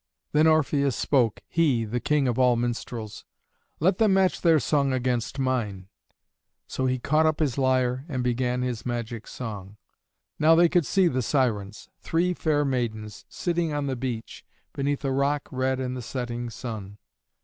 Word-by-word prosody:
Then 155 +2 +4
Orpheus 145 -4 +2
spoke, 120 -7 +1
he, 140 -9 +2
the 120 +3 -2
king 145 +2 +1
of 125 0 -1
all 125 -1 +5
minstrels, 115 -2 -4 0.6
"Let 185 +4 +2
them 215 -4 +4
match 190 -1 +2
their 165 -3 +5
song 140 +1 +1
against 125 0 -1
mine;" 110 -8 -2 0.8
so 130 - -2
he 130 0 +1
caught 155 +5 +2
up 155 -1 +1
his 145 -6 0
lyre 130 -1 +1
and 130 -4 -2
began 125 0 0
his 125 -3 -3
magic 120 -2 -4
song. 105 -4 -7 0.6
Now 160 +2 +6
they 170 0 +5
could 175 -4 +2
see 190 -2 +3
the 130 -5 0
Sirens. 110 -6 -1
Three 175 +2 0
fair 150 -4 +1
maidens, 110 -6 -3
sitting 170 -3 -1
on 145 -1 -1
the 135 -1 -2
beach, 120 -3 -5 0.3
beneath 145 +1 -2
a 135 - +1
rock 140 +2 0
red 130 0 0
in 130 -1 -2
the 130 - -5
setting 120 -1 -4
sun. 105 -4 -7
130 Hz, 165 wpm, -26 LUFS, 120-150 Hz, 0.8 s, Now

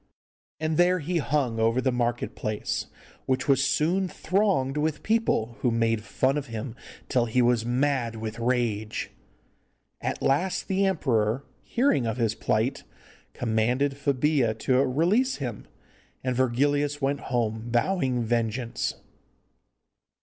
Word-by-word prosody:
And 155 0 -1
there 180 +1 +4
he 170 +1 -1
hung 135 -6 0
over 115 +2 +2
the 130 0 +1
market 120 0 -1
place, 105 -1 -3 0.4
which 130 0 0
was 135 -1 +4
soon 160 +7 +1
thronged 185 -9 0
with 150 0 -1
people, 215 - +1
who 125 - +2
made 115 -1 +1
fun 130 +5 0
of 140 - -8
him 115 +1 -5 0.3
till 125 -3 +1
he 115 +3 +1
was 120 -2 +3
mad 125 -2 0
with 110 +1 -5
rage. 115 -3 -1 0.9
At - - -2
last 175 +8 +1
the 195 +1 +2
emperor, 125 - +1 0.2
hearing 235 - +1
of 115 - -2
his 115 -3 +1
plight, 110 +3 0 0.5
commanded 120 +4 +1
Febilla 140 -3 +1
to 130 - +1
release 170 - +2
him, 120 -7 -5 0.6
and 130 -1 -1
Virgilius 145 +4 +1
went 140 0 0
home 115 -2 -2
vowing 130 -1 +1
vengeance. 115 +1 -1
130 Hz, 130 wpm, -26 LUFS, 115-145 Hz, 0.9 s, there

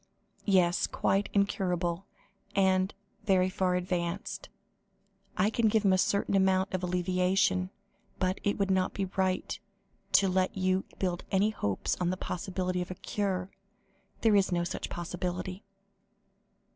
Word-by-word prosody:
"Yes, 180 -3 +3
quite 200 +1 0
incurable 185 -3 0 0.5
and 190 0 +3 0.3
very 185 -3 +3
far 185 -1 +1
advanced. 180 0 -3 0.9
I 200 +4 +3
can 230 0 +2
give 215 0 +2
him 190 - +5
a - - +4
certain 200 +1 +1
amount 190 0 +2
of 185 - -1
alleviation, 180 +1 +1 0.5
but 185 0 0
it 205 - +1
would 200 -2 +1
not 190 -1 +1
be 195 - 0
right 190 -1 0 0.5
to 195 - +6
let 185 +2 +1
you 185 0 +1
build 180 -2 -1
any 200 +3 +2
hopes 100 - -1
on 175 - +2
the 185 - -1
possibility 185 0 -2
of 180 - -5
a 185 - -5
cure. 190 -1 -2 0.7
There 220 -2 +4
is 195 -1 +3
no 175 -1 +1
such 175 - -4
possibility." 180 +2 -4
185 Hz, 140 wpm, -30 LUFS, 180-195 Hz, 0.9 s, to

